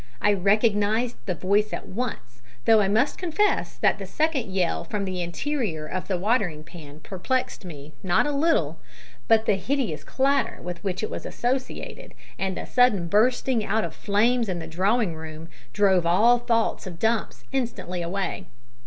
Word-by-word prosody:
I 205 - +3
recognised 210 +4 +2
the 180 - 0
voice 205 +5 +1
at - - -5
once, 185 - -5 0.2
though 220 -1 +6
I 195 - +2
must 220 +8 +1
confess 375 +4 0
that - - +2
the - - -6
second 300 -9 0
yell 185 -3 0
from 200 +4 -3
the 185 -1 -3
interior 175 - -2
of 185 +4 -4
the 190 - 0
watering 180 -6 0
pan 155 -2 -12
perplexed 200 +3 -2
me 150 -3 -9
not 180 +6 +2
a 295 - 0
little, 320 +4 +1 0.5
but 225 -1 +4
the 200 - +2
hideous 220 - -2
clatter 275 +1 +1
with 175 -1 -7
which 190 0 -2
it - - -3
was - - -5
associated, 260 - -4 0.2
and 190 -1 -1
the - - -5
sudden 215 -9 +3
bursting 240 +3 +2
out 220 +1 0
of - - -4
flames 225 +3 +1
in 180 - -1
the 165 - -5
drawing 190 +4 +1
room, 160 0 -8 0.2
drove 190 0 +3
all 230 +8 +5
thoughts 230 -4 0
of 175 -3 -7
Dumps 225 +3 -1
instantly 235 -9 -2
away. 190 +1 -3
205 Hz, 170 wpm, -25 LUFS, 180-240 Hz, 0.5 s, though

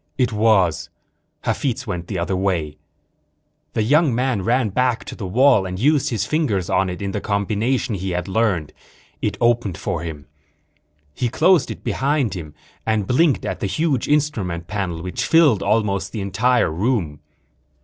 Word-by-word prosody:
It 125 -3 +1
was. 105 -6 +2 0.5
Hafitz 125 -2 -2
went 90 -6 -5
another 85 +3 -1
way. 90 -6 -1 1.0
The 110 - +1
young 145 +2 +3
man 125 -4 0
ran 115 +2 +1
back 125 +3 0
to - - -7
the 100 - -5
wall 120 -1 +4
and 90 0 -5
used 145 +6 +2
his 115 -3 -1
fingers 115 - 0
on 95 - +2
it 90 +2 -5
in 100 - -2
the 105 - -3
combination 110 +5 -1
he 95 -1 -3
had 90 0 -2
learned. 95 -6 0 0.5
It - - -1
opened 120 -6 +1
for - - -3
him. 80 -4 -7 0.9
He 120 +9 -1
closed 180 +5 +3
it - - -7
behind 140 -5 0
him 80 -5 -8 0.3
and 110 -2 0
blinked 145 - +2
at - - -3
the 100 - -1
huge 145 - 0
instrument 110 - 0
panel 90 -5 -3
which 90 +7 -3
filled 155 - +5
almost 105 -3 0
the 110 - -3
entire 105 +2 +1
room. 85 - -1
105 Hz, 160 wpm, -21 LUFS, 95-125 Hz, 1.0 s, filled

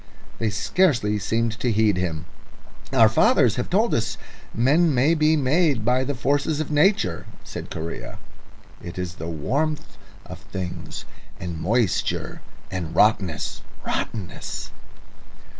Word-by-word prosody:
They 115 - +1
scarcely 110 - +2
seemed 115 +2 -1
to 120 -1 +1
heed 105 -2 +3
him. 85 -3 -2 0.7
"Our - - +6
fathers - - +4
have - - -2
told - - +2
us - - 0 0.3
men 145 +6 +3
may 135 +6 +4
be 155 -1 +3
made 145 -4 +2
by 125 +2 +3
the 145 +1 -2
forces 145 +5 0
of 155 -1 -3
Nature," 145 - +2 0.2
said - - -7
Correa. 80 +1 -6 0.6
"It 85 - -8
is 90 -2 -3
the 80 - -5
warmth 145 - -2 0.3
of - - -9
things 90 -2 -6 0.3
and 85 -3 -5
moisture, 110 +3 0 0.3
and 90 -4 -4
rottenness 95 -7 +2 0.2
rottenness." 100 -6 -4
115 Hz, 125 wpm, -24 LUFS, 90-145 Hz, 0.7 s, Our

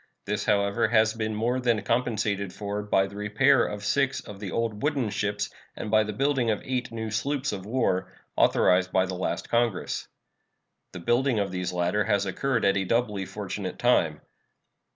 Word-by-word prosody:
This, - - -2
however, 100 0 +2
has 110 -1 +3
been 110 -1 -3
more 120 +4 0
than 120 -4 +1
compensated 105 -4 0
for 105 +1 -4
by 100 -2 +2
the 100 +1 -10
repair 105 +5 +3
of 105 0 -6
six 140 +4 +1
of 100 -1 -10
the 100 -2 -5
old 115 -3 -2
wooden 140 -7 0
ships 105 0 -1 0.3
and 105 - -5
by 110 0 +5
the 105 - -4
building 135 +1 +1
of 105 - +1
eight 125 -2 -2
new 110 -1 -4
sloops 140 +5 -1
of 95 -1 -6
war, 95 -6 0 0.2
authorized 90 0 +3
by 95 0 +3
the 95 - -5
last 90 +1 -3
Congress. 115 -5 0 0.8
The - - -7
building 120 +4 +2
of 100 -2 0
these 90 0 -2
latter 90 +4 0
has 100 -2 +1
occurred 120 +5 0
at 100 0 +3
a 95 - +1
doubly 105 -1 0
fortunate - - -5
time. - - +2
105 Hz, 180 wpm, -27 LUFS, 100-120 Hz, 0.8 s, by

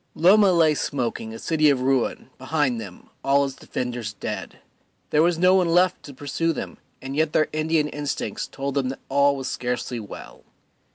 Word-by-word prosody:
Loma 195 +4 +6
lay 165 -3 +4
smoking, 120 -6 -3
a 115 - -7
city 155 +3 +2
of 135 -3 +2
ruin, 130 -1 0
behind 130 -3 0
them, 95 -5 -11
all 140 +1 +3
its 135 - -4
defenders 120 -5 -4
dead; - - -6 0.5
there 150 - +4
was 170 0 +3
no 180 +2 +5
one 185 -3 +3
left 180 +2 +3
to 145 - -10
pursue 145 +4 -2
them, - - -6 0.2
and 135 +1 -5
yet 155 0 +1
their 155 - +2
Indian 155 0 +1
instincts 145 -2 -4
told 140 0 -4
them 135 -2 0
that 135 - -6
all 140 +1 +3
was 135 -1 -5
scarcely 125 -1 -3
well. 105 - -10
140 Hz, 180 wpm, -24 LUFS, 130-160 Hz, 0.5 s, Loma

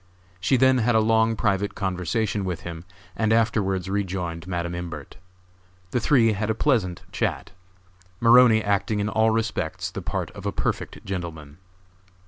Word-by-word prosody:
She 95 +8 +2
then 130 0 +4
had 120 0 +2
a - - +6
long 110 +1 +3
private 100 -1 0
conversation 100 +2 -1
with 90 -3 -3
him 85 0 -8 0.3
and 110 -1 0
afterwards 105 -5 +1
re 100 +1 0
joined 90 -2 -5
Madam 85 -1 -3
Imbert. 85 -4 -7 0.7
The 125 - +1
three 115 -3 +3
had 105 +2 -2
a 110 - +1
pleasant 110 - 0
chat, - - -2 0.7
Maroney 115 -1 +6
acting 105 +1 0
in 105 +1 -1
all 110 +2 +3
respects 110 -7 -2
the - - -6
part - - -3
of - - -7
a - - 0
perfect - - -3
gentleman. 80 -5 -6
100 Hz, 155 wpm, -24 LUFS, 90-110 Hz, 0.7 s, a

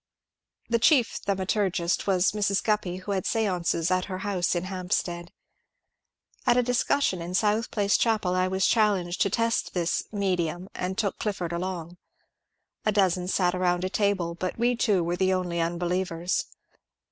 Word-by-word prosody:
The 235 0 +1
chief 250 -1 +3
thaumaturgist 190 -2 0
was 185 -1 +3
Mrs. 200 -2 0
Guppy, 210 -5 0
who 185 +2 -6
had 190 -2 -1
stances 180 -6 0
at 185 0 +1
her 185 -2 -5
house 185 -3 0
in 175 - -1
Hampstead. 180 -2 -3 1.2
At 245 - +5
a 250 - +4
discussion 245 -5 +1
in 175 +2 -4
South 215 +3 +1
Place 205 -1 +1
chapel 215 -6 +1
I 185 0 +2
was 190 0 +1
challenged 200 -6 +2
to 200 - +3
test 230 +1 0
this 175 -1 0
^ - - -15
medium,"" 185 -3 -1
and 185 +1 -3
took 205 -4 -1
Clifford 185 -6 -3
along. 175 -1 -4 0.9
A 215 - +2
dozen 185 -3 +2
sat 180 -1 +1
around 180 -1 +1
the 185 - -2
table, 200 -5 0
but 180 +2 -4
we 240 +2 +2
two 205 -6 +2
were 175 +1 -1
the 190 0 +2
only 175 -2 -1
unbelievers. 175 +1 -1
185 Hz, 160 wpm, -26 LUFS, 175-205 Hz, 1.2 s, At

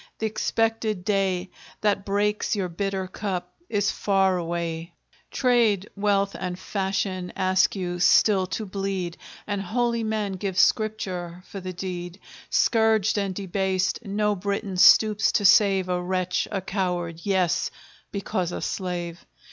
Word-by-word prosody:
th' - - -8
expected 220 -2 0
day 195 -3 +1 0.3
That 200 -2 +1
breaks 205 +2 0
your 190 -3 -2
bitter 195 +2 -2
cup 185 -2 -4 0.2
is 205 -2 +1
far 195 -2 +2
away; 170 -1 -3 0.3
Trade, 230 -6 +2
wealth, 200 -1 +1
and 180 -1 -3
fashion 190 -1 -2
ask 185 +1 +2
you 175 -2 -3
still 190 +2 +4
to 215 +3 -4
bleed, 190 -3 -3 0.3
And 205 -1 -2
holy 235 +4 0
men 215 -2 -1
give 190 -1 -3
Scripture 185 -6 0
for 200 - -8
the 185 0 -6
deed; 180 0 -6 0.3
Scourged 220 -2 +3
and 195 -2 -2
debased, 190 +1 -1
no 210 0 0
Briton 200 0 -3
stoops 215 +3 +6
to 205 - +1
save 195 -1 +5
A 180 -1 -1
wretch, 185 0 -1
a 195 -2 -1
coward 180 -4 -2
yes, 185 -3 +1 0.4
because 190 -3 -2
a - - -4
slave! 175 -2 -4
195 Hz, 135 wpm, -25 LUFS, 180-205 Hz, 0.4 s, stoops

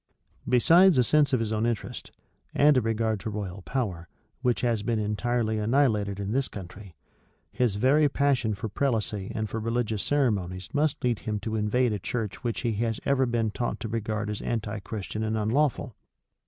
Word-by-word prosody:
Besides 170 +7 +6
a 125 - +5
sense 150 +3 +3
of 130 - +2
his 110 -1 -1
own 110 +2 +1
interest, 115 -4 -4 0.5
and 145 0 +5
a 130 - +4
regard 110 -1 0
to 110 - -4
royal 100 -2 -5
power, 95 -7 -3 0.3
which 125 -2 +1
has 115 -4 +1
been 115 +2 0
entirely 110 +1 0
annihilated 105 -4 +1
in 100 0 -3
this 135 +2 0
country, 95 -1 -10 0.6
his 120 -5 +1
very 140 +7 +4
passion 135 -6 +1
for 105 - -4
prelacy 110 -4 -1
and 110 -1 -1
for 110 - -4
religious 115 -2 -1
ceremonies 100 -10 0
must 150 0 0
lead 120 -3 +1
him 105 -1 -3
to 110 +1 -3
invade 110 +3 +1
a 105 - -2
church 110 +4 -4
which 120 -2 -2
he 120 - 0
has 115 -1 -1
ever 135 -2 +2
been 115 -2 0
taught 120 +3 -3
to 115 - -3
regard 110 -1 -2
as 105 - -5
anti 110 -2 -3
Christian 105 +1 -5
and 110 0 -1
unlawful. 125 +2 0
110 Hz, 180 wpm, -27 LUFS, 105-125 Hz, 0.6 s, Besides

